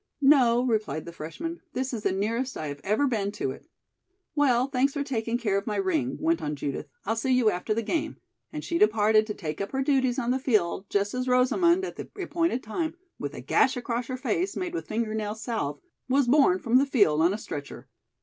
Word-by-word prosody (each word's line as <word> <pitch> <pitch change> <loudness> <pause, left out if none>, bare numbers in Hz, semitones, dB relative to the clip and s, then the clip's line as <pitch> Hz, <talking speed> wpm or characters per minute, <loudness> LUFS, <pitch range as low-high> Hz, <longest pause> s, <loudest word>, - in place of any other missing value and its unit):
"No," 250 -4 +5
replied 210 - -1
the 170 - -7
freshman, 330 - -6
"this 260 0 -2
is 225 - -3
the - - +1
nearest 230 +7 -1
I 155 - -4
have 145 0 -7
ever 215 +8 +2
been 210 -6 0
to 135 -10 -2
it." 135 - -11 0.7
"Well, 260 -5 +3
thanks 275 0 +1
for 285 - -1
taking 235 -4 -1
care 205 -5 +1
of 200 - -12
my 210 - -1
ring," 310 -8 0
went 330 +1 +1
on 150 0 -2
Judith. 140 -1 -4 0.2
"I'll 225 +3 0
see 225 +4 -2
you 235 -4 +4
after 180 +5 -4
the 230 - -1
game," 315 +7 -2 0.3
and 300 -1 -5
she 335 - -1
departed 215 0 +4
to 210 - -4
take 155 -2 -5
up 200 - -4
her 270 0 0
duties 260 -3 +2
on 245 -2 0
the 260 - +1
field, 205 -7 0
just 200 0 0
as 250 0 -2
Rosamond, 340 +9 +3
at - - -7
the - - -7
appointed 335 -8 0
time, 315 +10 -3 0.2
with - - -5
a - - -7
gash 260 - +2
across 240 0 -3
her 255 - -4
face, 365 +8 -1
made 360 -1 -3
with 345 - -4
finger 220 0 -2
nail 215 -1 -2
salve, 220 - -3 0.3
was 270 0 +3
borne 260 -8 +5
from 235 +5 +2
the 280 - +2
field 200 - +3
on 170 +3 +4
a 205 - -2
stretcher. 145 -9 -7
240 Hz, 225 wpm, -27 LUFS, 210-275 Hz, 0.7 s, No